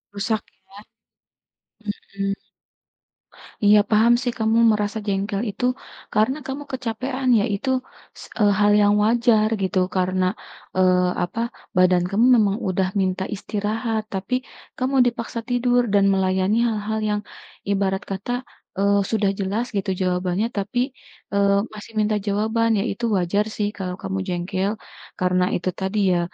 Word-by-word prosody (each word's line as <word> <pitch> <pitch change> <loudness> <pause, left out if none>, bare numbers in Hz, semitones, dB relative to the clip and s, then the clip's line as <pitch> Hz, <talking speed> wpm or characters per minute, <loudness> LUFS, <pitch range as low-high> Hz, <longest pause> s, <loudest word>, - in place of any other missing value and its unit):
Rusak 215 +2 0 0.3
ya, 200 - -13 1.4
mhm, 195 0 0 1.3
iya 210 +1 +7
paham 225 +2 +5
sih 245 -1 -1
kamu 220 +1 +2
merasa 210 0 -1
jengkel 200 +1 -1
itu 225 +5 -3 0.5
karena 220 +7 +2
kamu 270 +2 -4
kecapekan 255 +1 -2
ya 200 - +1
itu 265 +7 -4 0.5
s - - -9 0.2
eee, 205 -1 +5
hal 205 0 +5
yang 205 0 +4
wajar 225 -1 +3
gitu 190 0 +1 0.2
karena, 185 0 +1 0.5
eee, 185 -1 +4 0.2
apa 175 +6 -4 0.4
badan 180 -1 +4
kamu 220 +4 +3
memang 205 -3 +2
udah 185 0 +1
minta 185 0 0
istirahat 215 +2 -2
tapi 195 +6 -2 0.4
kamu 260 +2 0
dipaksa 235 0 -3
tidur 245 0 +3
dan 200 -1 +5
melayani 190 +2 +1
hal-hal 220 0 -2
yang 210 0 0 0.5
ibarat 195 0 0
kata, 195 +5 -4 0.5
eee, 200 0 +3
sudah 210 -3 +2
jelas 200 +5 -1
gitu 195 0 -1
jawabannya 180 +3 0
tapi, 205 +5 -1 0.5
eee, 200 0 +3 0.2
masih 215 +1 -10
minta 215 0 +2
jawaban 220 +3 +1
ya - - 0
itu 235 +4 -3
wajar 195 +4 +1
sih 205 -1 0
kalau 180 -2 -4
kamu 195 0 -2
jengkel, 185 +2 -1 0.5
karena 180 0 +2
itu 180 +1 -1
tadi 190 +2 -2 0.2
ya - - +2
205 Hz, 140 wpm, -22 LUFS, 190-225 Hz, 1.4 s, iya